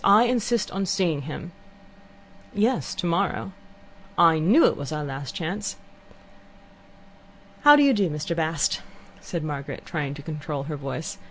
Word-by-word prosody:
I 205 Hz, +3 st, +7 dB
insist 240 Hz, -1 st, 0 dB
on 195 Hz, 0 st, -2 dB
seeing 180 Hz, -6 st, +1 dB
him." 170 Hz, +3 st, -7 dB, 1.0 s
"Yes, 225 Hz, +5 st, +1 dB
tomorrow." 180 Hz, +3 st, -1 dB, 0.7 s
"I 165 Hz, -2 st, +6 dB
knew 210 Hz, -, +5 dB
it -, -, +3 dB
was 140 Hz, +1 st, -6 dB
our 150 Hz, -1 st, -2 dB
last 135 Hz, -2 st, -6 dB
chance." 195 Hz, +5 st, -3 dB, 1.9 s
"How 295 Hz, 0 st, +9 dB
do 290 Hz, -, +5 dB
you 275 Hz, -1 st, +5 dB
do, 200 Hz, -5 st, +2 dB
Mr. 150 Hz, +3 st, -3 dB
Bast?" 160 Hz, -2 st, 0 dB, 0.4 s
said 170 Hz, -3 st, -5 dB
Margaret, 145 Hz, -2 st, -5 dB
trying 145 Hz, -4 st, -3 dB
to 145 Hz, -, -10 dB
control 150 Hz, -2 st, -4 dB
her 150 Hz, +1 st, -5 dB
voice. 140 Hz, +3 st, -5 dB
165 Hz, 145 wpm, -25 LUFS, 150-200 Hz, 1.9 s, How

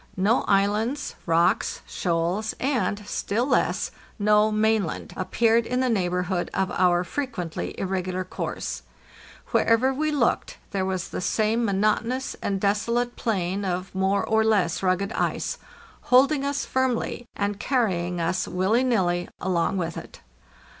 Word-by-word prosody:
No 205 Hz, +6 st, +3 dB
islands, 210 Hz, +8 st, +1 dB
rocks, 165 Hz, +1 st, +2 dB
shoals, 175 Hz, +5 st, -1 dB
and, 245 Hz, -6 st, 0 dB
still 220 Hz, +3 st, -1 dB
less, 275 Hz, -, +1 dB, 0.3 s
no 210 Hz, 0 st, +4 dB
mainland, 215 Hz, -4 st, 0 dB
appeared 225 Hz, +4 st, +2 dB
in 250 Hz, +1 st, 0 dB
the 255 Hz, -1 st, +2 dB
neighborhood 180 Hz, -2 st, 0 dB
of 190 Hz, -1 st, 0 dB
our 180 Hz, -1 st, +3 dB
frequently 180 Hz, -, -4 dB
irregular 185 Hz, -1 st, -2 dB
course; 185 Hz, -, -4 dB, 0.7 s
wherever 245 Hz, +4 st, +3 dB
we 310 Hz, +3 st, 0 dB
looked 285 Hz, -6 st, 0 dB
there 190 Hz, -1 st, -1 dB
was 190 Hz, -1 st, -2 dB
the -, -, -4 dB
same 220 Hz, +5 st, +1 dB
mo 205 Hz, -, 0 dB
notonous 225 Hz, +6 st, 0 dB
and 195 Hz, -1 st, -1 dB
desolate 235 Hz, +5 st, 0 dB
plain 195 Hz, -3 st, -1 dB
of 185 Hz, 0 st, -3 dB
more 190 Hz, +1 st, +1 dB
or 220 Hz, 0 st, +3 dB
less 200 Hz, -7 st, +2 dB
rugged 190 Hz, +2 st, +1 dB
ice, -, -, -1 dB, 0.5 s
hold 260 Hz, +3 st, +6 dB
ing 285 Hz, -3 st, 0 dB
us 280 Hz, 0 st, -1 dB
firmly, 250 Hz, -2 st, -1 dB
and 205 Hz, 0 st, -2 dB
carrying 180 Hz, -10 st, 0 dB
us 170 Hz, +2 st, 0 dB
willy 195 Hz, +7 st, +1 dB
nilly 180 Hz, -8 st, +1 dB
along 180 Hz, 0 st, 0 dB
with 165 Hz, -2 st, -3 dB
it. -, -, -10 dB
205 Hz, 140 wpm, -25 LUFS, 185-235 Hz, 0.7 s, hold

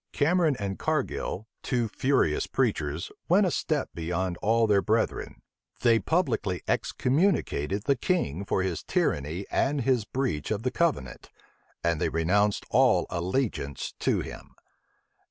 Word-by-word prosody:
Cameron 160 Hz, 0 st, +3 dB
and 100 Hz, -1 st, -3 dB
Cargil, 105 Hz, -, -2 dB, 0.2 s
two 120 Hz, -3 st, 0 dB
furious 125 Hz, -, +1 dB
preachers, 75 Hz, +3 st, -1 dB, 0.2 s
went 195 Hz, +4 st, +5 dB
a 180 Hz, -, +1 dB
step 155 Hz, -3 st, -1 dB
beyond 85 Hz, +2 st, -2 dB
all 115 Hz, +2 st, +2 dB
their 100 Hz, -2 st, +3 dB
brethren: -, -, -1 dB, 0.4 s
they 115 Hz, -1 st, +5 dB
publicly 125 Hz, -, 0 dB
excommunicated 125 Hz, -, 0 dB
the 140 Hz, +2 st, +2 dB
king 125 Hz, -, -1 dB
for 95 Hz, -1 st, 0 dB
his 90 Hz, -4 st, -2 dB
tyranny 75 Hz, +7 st, -1 dB
and 140 Hz, 0 st, +1 dB
his 125 Hz, -2 st, +2 dB
breach 125 Hz, -, -2 dB
of 110 Hz, 0 st, -2 dB
the 125 Hz, -, 0 dB
covenant, 150 Hz, -, -1 dB, 0.5 s
and 85 Hz, -2 st, +1 dB
they -, -, +2 dB
renounced 100 Hz, +5 st, +1 dB
all -, -, +4 dB
allegiance 90 Hz, -, -2 dB
to -, -, +1 dB
him. -, -, -9 dB
105 Hz, 135 wpm, -27 LUFS, 85-135 Hz, 0.5 s, went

